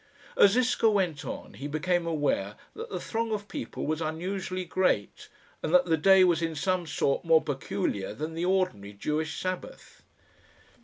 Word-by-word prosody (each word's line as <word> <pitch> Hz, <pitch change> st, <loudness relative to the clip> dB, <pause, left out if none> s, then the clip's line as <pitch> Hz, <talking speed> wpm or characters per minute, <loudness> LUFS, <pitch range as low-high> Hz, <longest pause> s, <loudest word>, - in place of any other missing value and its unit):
As 195 Hz, -, +6 dB
Ziska 250 Hz, -2 st, +3 dB
went 185 Hz, -8 st, 0 dB
on, -, -, -7 dB
he 140 Hz, -, -6 dB
became 170 Hz, +3 st, 0 dB
aware 145 Hz, -11 st, 0 dB, 0.2 s
that 455 Hz, +2 st, -7 dB
the -, -, -4 dB
throng 225 Hz, 0 st, -2 dB
of 205 Hz, -1 st, -3 dB
people 290 Hz, -, -5 dB
was 155 Hz, +2 st, -1 dB
unusually 185 Hz, +3 st, -3 dB
great, 185 Hz, +2 st, 0 dB, 0.3 s
and -, -, -2 dB
that 270 Hz, -, +6 dB
the 165 Hz, -, +2 dB
day 190 Hz, +4 st, +6 dB
was 170 Hz, -3 st, +3 dB
in 165 Hz, -1 st, -2 dB
some 180 Hz, +2 st, 0 dB
sort 140 Hz, -2 st, 0 dB
more 165 Hz, -2 st, +4 dB
peculiar 100 Hz, -8 st, -2 dB
than 155 Hz, +9 st, -5 dB
the 165 Hz, +2 st, -2 dB
ordinary 185 Hz, -, 0 dB
Jewish 155 Hz, +9 st, -2 dB
Sabbath. 185 Hz, -, -6 dB
170 Hz, 165 wpm, -28 LUFS, 150-190 Hz, 0.3 s, As